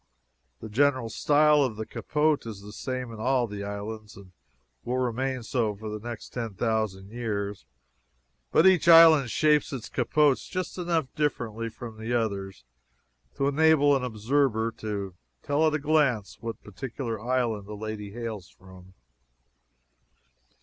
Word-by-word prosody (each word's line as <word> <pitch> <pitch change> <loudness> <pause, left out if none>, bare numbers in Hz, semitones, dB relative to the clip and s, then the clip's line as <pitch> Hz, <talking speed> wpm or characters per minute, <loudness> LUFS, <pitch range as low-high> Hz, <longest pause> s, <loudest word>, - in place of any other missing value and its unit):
The - - -6
general 130 +1 +1
style 150 +5 +4
of 130 -6 0
the 110 +1 -5
capote 150 0 0
is 105 -3 -7
the 105 +1 -10
same 130 +1 -5
in 110 - -9
all 125 +2 +2
the 105 -2 -6
islands, 105 +1 -6
and 95 -2 -14 0.5
will 125 +1 -2
remain 130 +1 -1
so 115 -3 -1
for 110 +2 -7
the 105 0 -5
next 115 0 -7
ten 115 -5 -5
thousand 105 -3 -2
years, 105 -4 -4 0.8
but 160 - +4
each 185 -4 +5
island 165 -5 +8
shapes 150 +5 +2
its 130 -5 -6
capotes 140 +3 +2
just 185 0 -4
enough 170 -6 -1
differently 115 -6 -2
from 115 0 -10
the 115 +2 -2
others 100 - -3 0.7
to 135 0 0
enable 145 -1 +4
an 135 - -1
observer 115 0 0
to 100 -3 -4 0.3
tell 150 +3 +2
at 155 - +1
a - - +2
glance 145 -8 +1
what 115 -1 -6
particular 115 +1 -5
island 120 -4 -1
a 105 - -7
lady 105 -1 -6
hails 110 -4 -6
from. 95 0 -16
115 Hz, 150 wpm, -27 LUFS, 105-140 Hz, 0.8 s, island